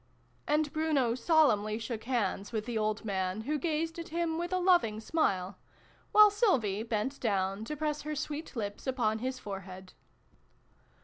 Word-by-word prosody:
" - - -37
And 300 0 +1
Bruno 305 -7 +1
solemnly 235 -7 +3
shook 225 0 -5
hands 205 -5 -1
with 215 -2 -2
the 240 -1 -4
old 215 0 -1
man, 190 0 -1
who 295 +6 -2
gazed 325 +2 -1
at 335 - -6
him 335 0 -1
with 345 +1 -3
a 370 - +1
loving 350 - +3
smile, 200 - -1 0.5
while 425 -1 +8
Sylvie 255 - +2
bent 225 +4 -2
down 195 -2 0
to 300 +5 -5
press 300 0 -1
her 305 +1 -4
sweet 300 +1 -5
lips 205 +1 -4
upon 235 -4 0
his 260 +2 -3
forehead. 190 -4 -8
245 Hz, 165 wpm, -31 LUFS, 210-310 Hz, 0.5 s, while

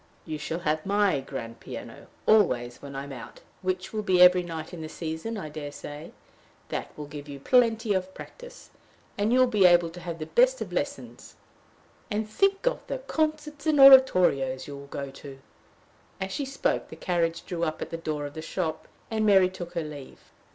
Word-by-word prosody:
"You 155 -2 -5
shall 160 +4 -4
have 155 -1 0
my 200 -5 +2
grand 120 -4 -7
piano - - -9 0.2
always 125 - +3
when 140 -1 -9
I 135 - -4
am 140 - -9
out, 120 -4 -10 0.2
which 185 0 -3
will 215 - -1
be 185 -3 +2
every 180 0 +8
night 165 -1 -7
in 170 - -7
the 155 - -6
season, 160 +8 -5
I 190 - -5
dare 145 -1 -6
say. 145 +2 -9 0.6
That - - -4
will 150 - -6
give 145 0 -9
you 140 -1 -7
plenty 225 - +3
of 190 0 -2
practice; - - -12 0.4
and 205 +2 0
you 250 - +4
will 255 - +6
be 210 -6 +5
able 175 -1 +4
to 175 - -10
have 170 -1 -6
the 155 - -5
best - - +3
of - - -6
lessons. - - -5 0.7
And 215 +1 -2
think 390 - +1
of - - +1
the - - -2
concerts 310 -9 -2
and 305 -2 +3
oratorios 180 - +6
you 145 - -8
will 140 0 -10
go 140 -1 -6
to!" 135 0 -11 0.8
As 190 0 -3
she 280 +8 -2
spoke, 270 +1 -1
the - - -10
carriage 170 -2 -1
drew 170 -2 -3
up 155 -1 -1
at - - -6
the - - -3
door 155 -3 -3
of 145 - -7
the 160 - -6
shop, 160 -1 -3 0.2
and 220 -1 0
Mary 195 -3 +5
took 175 -2 -8
her 170 - -2
leave. 145 -3 -11
175 Hz, 200 wpm, -27 LUFS, 150-215 Hz, 0.8 s, every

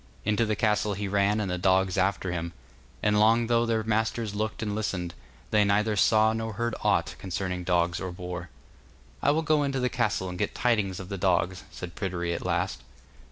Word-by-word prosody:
Into 105 +2 +2
the 110 - +1
castle 105 -1 +1
he 100 +1 -3
ran, 100 +2 +2
and 100 -3 -1
the 90 - -2
dogs 95 0 +3
after 95 -1 0
him, 85 0 -3 0.5
and 105 0 +3
long 115 +2 +4
though 115 0 +2
their 110 -1 +1
masters 110 0 0
looked 110 +1 -2
and 105 -1 -2
listened, 95 -5 -2 0.4
they 105 -1 +5
neither 105 +2 +2
saw 110 +2 +4
nor 110 0 -3
heard 120 +2 -2
aught - - +2
concerning 90 -1 -3
dogs 85 -1 +1
or 95 -1 -3
boar. 90 -1 -6 0.7
'I - - +3
will 155 +3 +2
go 155 -1 +3
into 140 -2 0
the 125 0 +1
castle 110 -7 0
and 90 -1 -6
get 105 - -1
tidings 105 -7 +1
of 95 0 -8
the 100 -2 -4
dogs,' 90 0 +1
said 90 +1 -8
Pryderi 85 -3 -2
at - - -4
last. 90 -4 -1
100 Hz, 200 wpm, -27 LUFS, 90-110 Hz, 0.7 s, they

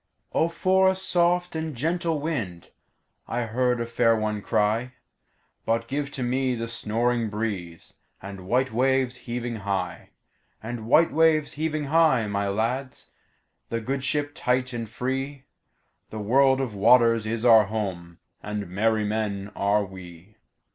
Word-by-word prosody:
"O 165 - +2
for 190 +2 +3
a 190 - +1
soft 180 -1 +1
and 160 -2 -3
gentle 165 +4 -1
wind!"I 120 - -6
heard 125 +2 0
a 120 - -1
fair 115 0 +2
one 110 -1 -2
cry:But 115 +1 -3
give 140 +2 -2
to 130 - -3
me 130 +1 0
the 115 0 -4
snoring 115 0 -1
breezeAnd 100 -1 -6
white 125 +8 0
waves 130 +1 +1
heaving 120 -1 -5
high; 95 -4 -3 0.5
And 115 -1 -6
white 160 +6 +5
waves 155 -1 +3
heaving 155 0 -2
high, 145 -5 +3
my 100 -1 -1
lads, 125 +6 -3 0.6
The 115 - -1
good 130 +4 -3
ship 145 +1 -1
tight 125 0 0
and 115 -2 -4
free—The 135 -1 -7
world 130 +5 +3
of 125 -5 -3
waters 115 +1 +4
is 115 +1 -2
our 110 -3 +7
home, 95 -5 -4 0.2
And 105 -2 -5
merry 110 +2 +1
men 105 -1 -2
are 100 +1 +1
we. 95 +1 -12
120 Hz, 135 wpm, -25 LUFS, 105-135 Hz, 0.6 s, our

